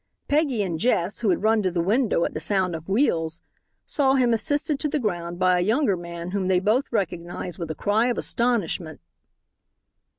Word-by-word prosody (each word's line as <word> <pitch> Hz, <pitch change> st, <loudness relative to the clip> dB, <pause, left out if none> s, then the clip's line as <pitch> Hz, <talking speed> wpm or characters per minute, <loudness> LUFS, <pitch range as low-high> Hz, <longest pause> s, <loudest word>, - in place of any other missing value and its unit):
Peggy 285 Hz, -7 st, +1 dB
and 170 Hz, -4 st, -3 dB
Jess 195 Hz, -3 st, 0 dB
who 220 Hz, -, 0 dB
had 185 Hz, -, +1 dB
run 220 Hz, 0 st, +3 dB
to 190 Hz, -, +1 dB
the 175 Hz, -1 st, -2 dB
window 205 Hz, +1 st, +2 dB
at -, -, -4 dB
the -, -, -3 dB
sound 190 Hz, -4 st, +1 dB
of 160 Hz, +3 st, -9 dB
wheels 170 Hz, -, 0 dB, 0.4 s
saw 270 Hz, -2 st, +2 dB
him 245 Hz, -3 st, +3 dB
assisted 290 Hz, +4 st, 0 dB
to 300 Hz, -, 0 dB
the 300 Hz, -, 0 dB
ground 175 Hz, -8 st, -3 dB
by 185 Hz, 0 st, +3 dB
a -, -, +1 dB
younger 225 Hz, +1 st, +2 dB
man 170 Hz, 0 st, -7 dB
whom 195 Hz, -1 st, -1 dB
they 185 Hz, -1 st, +3 dB
both 220 Hz, +9 st, +1 dB
recognized 175 Hz, -3 st, -3 dB
with 165 Hz, -2 st, -4 dB
a 155 Hz, -, -3 dB
cry 215 Hz, +4 st, +1 dB
of 245 Hz, -, -1 dB
astonishment. 205 Hz, -9 st, -1 dB
195 Hz, 195 wpm, -24 LUFS, 175-240 Hz, 0.4 s, run